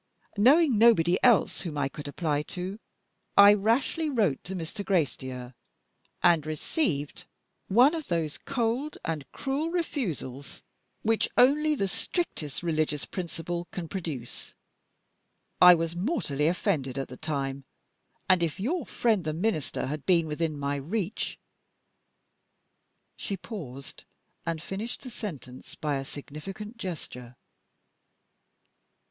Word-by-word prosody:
Knowing 260 +3 +5
nobody 185 -7 +5
else 240 -4 +4
whom 160 -5 -5
I 140 -1 +1
could 145 +1 -8
apply 145 0 -1 0.2
to, 185 +4 -4 0.6
I 200 +1 +10
rashly 230 +10 +1
wrote 210 - +1
to 190 - -5
Mr. 180 +4 -5
Gracedieu, 130 - -1 0.7
and 170 -3 +5
received 155 - -2 0.4
one 245 - +6
of 320 -3 -4
those 165 -4 -1
cold 260 +3 -1
and 155 -4 -4
cruel 285 +4 -2
refusals 185 - -3 0.4
which 225 0 +2
only 300 +4 +5
the 200 -8 0
strictest 180 - -3
religious 155 -3 0
principle 175 -1 -4
can 175 -3 -5
produce. 155 -10 -6 1.1
I 180 0 +10
was 165 0 -2
mortally 175 - 0
offended 160 - 0
at 135 - -2
the 125 - -9
time; 140 -2 -3 0.6
and 185 -2 +5
if 165 0 -1
your 290 - -1
friend 220 -6 +1
the 155 -1 -2
Minister 165 -3 -1
had 150 +2 -5
been 170 -3 +4
within 155 0 -2
my 140 0 -1
reach 190 - -3 1.0
" - - -48
She 200 - -3
paused, 140 - -8 0.4
and 165 -1 -2
finished 205 +6 -5
the 255 - -8
sentence 145 - -8
by 150 -2 -1
a 135 - -4
significant 195 - -8
gesture. 125 - -6
175 Hz, 125 wpm, -28 LUFS, 150-225 Hz, 1.1 s, I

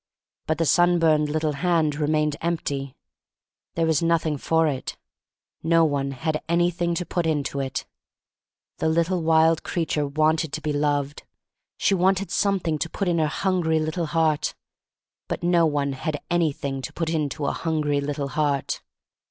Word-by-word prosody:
But 155 - 0
the 165 - +1
sunburned 165 -3 +3
little 155 0 0
hand 160 0 +1
re 150 0 -1
mained 150 -1 +1
empty. 140 -5 -2 0.8
There 165 - +1
was 160 -3 +2
nothing 165 -2 +1
for 160 +3 +1
it. 135 -4 -3 0.6
No 165 0 +4
one 140 -2 0
had 155 +3 -2
anything 175 0 +1
to 180 - -2
put 175 -2 -1
into 145 -3 -1
it. 135 -1 -3 0.9
The 160 - +1
little 170 +2 +1
wild 160 0 +4
creature 155 -4 -1
wanted 155 +1 +1
to 155 - -3
be 150 -1 -2
loved; 145 -1 0 0.6
she - - +2
wanted 190 +1 +1
something 185 -6 0
to 165 - -2
put 195 +3 -3
in 170 -1 +1
her 155 - +2
hungry 170 -1 0
little 160 +2 -2
heart. 155 -1 +1 0.7
But - - -4
no 170 -1 +4
one 140 -2 -1
had 150 +2 -3
anything 140 -5 0
to - - -6
put 165 -1 -2
into 150 -2 -2
a - - +1
hungry 150 -3 -1
little 140 -1 -3
heart. 145 -1 -1
160 Hz, 160 wpm, -24 LUFS, 145-170 Hz, 0.9 s, No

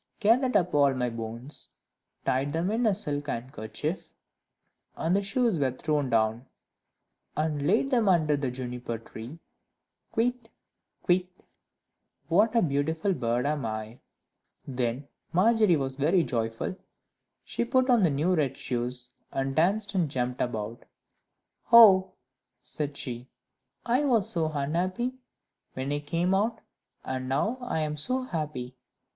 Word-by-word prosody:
"Gathered 250 +4 +3
up 180 -1 0
all 140 -2 +4
my 125 -1 -1
bones, 115 +5 -4 0.6
Tied 135 +3 0
them 170 +4 0
in 230 +1 +1
a 205 - +3
silk 145 -7 -2
handkerchief," 115 - -4 0.8
And 165 +3 0
the 200 - +2
shoes 200 -2 +1
were 135 -2 +2
thrown 145 0 -1
down. 115 +2 +1 0.9
"And 150 -2 0
laid 225 - +2
them 235 -5 +3
under 155 -5 +3
the 140 -2 -1
Juniper 125 -2 -5
tree: 115 +5 -10 0.7
Kywitt! 240 0 -1 0.6
Kywitt! 180 0 +3 1.0
what 210 +7 +3
a 230 - +4
beautiful 160 +5 0
bird 120 -4 -1
am 145 -1 0
I!" 110 +1 -5 0.7
Then 125 +1 -2 0.3
Margery 215 0 +4
was 135 -2 -2
very 165 +5 +3
joyful; 115 +6 -2 0.7
she - - -2
put 255 +2 +2
on 245 -4 +4
the 175 - +4
new 150 +6 +1
red 140 -6 0
shoes, 125 0 -3 0.2
and 135 0 -2
danced 200 +6 +2
and 175 -6 +1
jumped 125 -1 -2
about. 110 -1 -3 0.9
"Oh," 200 -5 +8 0.5
said 145 -2 -4
she, 125 -1 -5 0.6
"I 250 +4 +2
was 230 -8 +2
so 160 -3 0
unhappy 180 - -1 0.6
when 130 +2 -3
I 145 - 0
came 170 +5 0
out, 215 +4 +1 0.5
and 130 0 -3
now 215 - 0
I 245 -10 -2
am 150 0 -2
so 255 - +1
happy! 150 - -4
150 Hz, 135 wpm, -28 LUFS, 130-195 Hz, 1.0 s, Oh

